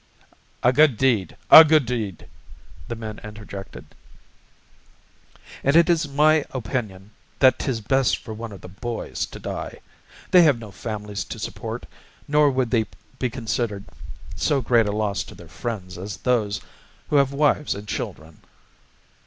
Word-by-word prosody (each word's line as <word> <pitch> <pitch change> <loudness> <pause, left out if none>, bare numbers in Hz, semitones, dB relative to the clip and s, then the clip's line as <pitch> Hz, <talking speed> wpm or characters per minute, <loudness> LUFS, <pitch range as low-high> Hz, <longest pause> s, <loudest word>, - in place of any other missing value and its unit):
"A 125 - +4
good 150 -4 +5
deed! 120 -7 +1
A 160 - +13
good 155 -3 +4
deed!" 110 -7 -4 0.6
the 115 - -4
men 110 -2 -7
interjected. 100 -4 -9 1.8
"And 140 +3 +2
it 170 +1 +6
is 160 -2 +1
my 150 +2 +3
opinion 110 -5 -4 0.3
that 130 -1 +5
'tis 125 -6 -2
best 135 +4 +2
for 110 - -9
one 115 +1 -7
of 100 - -11
the - - -10
boys 115 +6 -4
to - - -10
die. - - -6 0.5
They 180 - +8
have 150 -7 +5
no 110 -3 -10
families 105 -1 -5
to - - -7
support, - - -6 0.4
nor 150 0 +4
would 130 -3 -1
they 110 -4 +2 0.3
be 125 - 0
considered 115 -4 -3 0.5
so 145 - +1
great 115 -3 +3
a - - 0
loss 105 -1 -1
to - - -12
their 85 - -13
friends 90 -2 -6
as 100 +1 -6
those 110 -5 0 0.5
who 150 - +4
have 140 -1 +3
wives 150 +1 +1
and 100 +1 -9
children." 80 -5 -6
115 Hz, 155 wpm, -23 LUFS, 105-135 Hz, 1.8 s, A